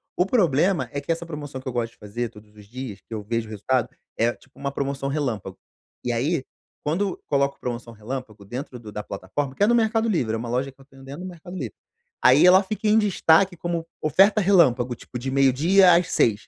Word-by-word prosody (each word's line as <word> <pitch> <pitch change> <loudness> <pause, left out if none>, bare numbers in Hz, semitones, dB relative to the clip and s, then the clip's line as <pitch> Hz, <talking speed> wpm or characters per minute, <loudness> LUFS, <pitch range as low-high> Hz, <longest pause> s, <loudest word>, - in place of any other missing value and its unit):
O 180 - +2
problema 175 - +2
é 140 - -3
que 145 - -3
essa 165 +1 -2
promoção 145 -4 -7
que 130 - -11
eu 130 - -3
gosto 115 -2 -1
de - - -28
fazer 115 +3 -4
todos 105 -1 -17
os 105 -1 -14
dias, 120 -3 -7
que 115 - -12
eu 110 - -3
vejo 115 +1 -2
resultado, 115 +4 0 0.3
é 120 +1 +2
tipo 130 - -24
uma 140 - -3
promoção 140 0 -3
relâmpago. 120 -10 -3 0.5
E 125 - -1
aí, 135 +5 0 0.4
quando 180 +6 -1
coloco 140 -1 +1
promoção 120 -1 -5
relâmpago 110 -2 -7
dentro 125 +4 -6
do 110 -2 -10
da 105 0 -5
plataforma, 105 +9 -4
que 200 - +1
é - - +5
no 235 - +4
Mercado 225 0 +2
Livre, 125 - 0
é - - 0
uma 115 +1 -5
loja 130 +3 -1
que 135 - -33
eu 135 - -17
tenho 135 -1 -17
dentro 140 +5 -8
do - - -5
Mercado 175 0 -10
Livre, 130 - -5 0.5
aí 130 +6 +7
ela 185 +2 +7
fica 215 +2 -3
em 210 +1 +5
destaque 195 -3 +3
como 170 0 -3 0.2
oferta 195 +8 +4
relâmpago, 130 -11 +4
tipo 125 - -8
de 130 - -4
meio-dia 155 +8 +5
às 175 +1 +2
18:00. 110 -1 +2
135 Hz, 220 wpm, -24 LUFS, 120-175 Hz, 0.5 s, aí